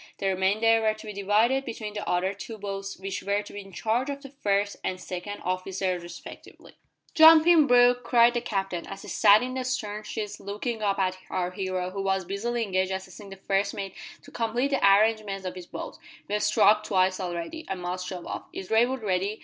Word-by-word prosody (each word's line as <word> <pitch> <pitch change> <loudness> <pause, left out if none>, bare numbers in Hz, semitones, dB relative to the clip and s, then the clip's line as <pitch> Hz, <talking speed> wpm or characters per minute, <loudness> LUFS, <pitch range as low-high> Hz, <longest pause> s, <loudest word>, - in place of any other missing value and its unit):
The - - -5
remainder 210 +5 +2
were 215 -1 +1
to 215 +1 -12
be 210 - -6
divided 215 +7 +2
between 225 -4 -6
the 210 - -5
other 180 +2 +1
two 220 +3 -8
boats 195 -1 -5
which 195 0 -5
were 200 +1 -1
to - - -12
be 205 - -6
in 195 0 -14
charge 230 +8 -1
of 280 0 -5
the 275 - -10
first 200 -6 -1
and 185 -1 -3
second 185 +3 -6
officers 185 0 -2
respectively. 175 0 -12 0.4
"Jump 320 0 +8
in, 335 -4 +6
Brooke," 245 0 +5
cried 235 -1 +5
the 240 - -1
Captain, 195 -5 -3
as 195 - -8
he - - -10
sat 210 +2 +5
in 255 0 -4
the 260 0 -2
stern 215 -5 -3
sheets 210 -1 -5
looking 210 +3 -4
up 200 -2 +1
at 185 -1 0
our 180 -1 -2
hero, 185 -1 -3
who 195 +1 -4
was 190 -1 0
busily 230 +5 -2
engaged 190 -2 0
assisting 190 +2 -7
the 195 - -9
first 195 +1 -1
mate 195 -2 -5 0.3
to - - -15
complete 240 +4 -1
the 275 - 0
arrangements 200 -1 +3
of 185 - -3
his 180 -1 -10
boat, - - -8 0.3
"we've 210 +1 -1
struck 210 +1 +4
twice 185 -2 +1
already. 180 - -5
I 190 - -1
must 180 0 -4
shove 180 -2 -6
off. - - -6
Is 190 - -8
Raywood 240 +2 +2
ready?" 200 +2 -1
200 Hz, 210 wpm, -26 LUFS, 190-225 Hz, 0.4 s, Jump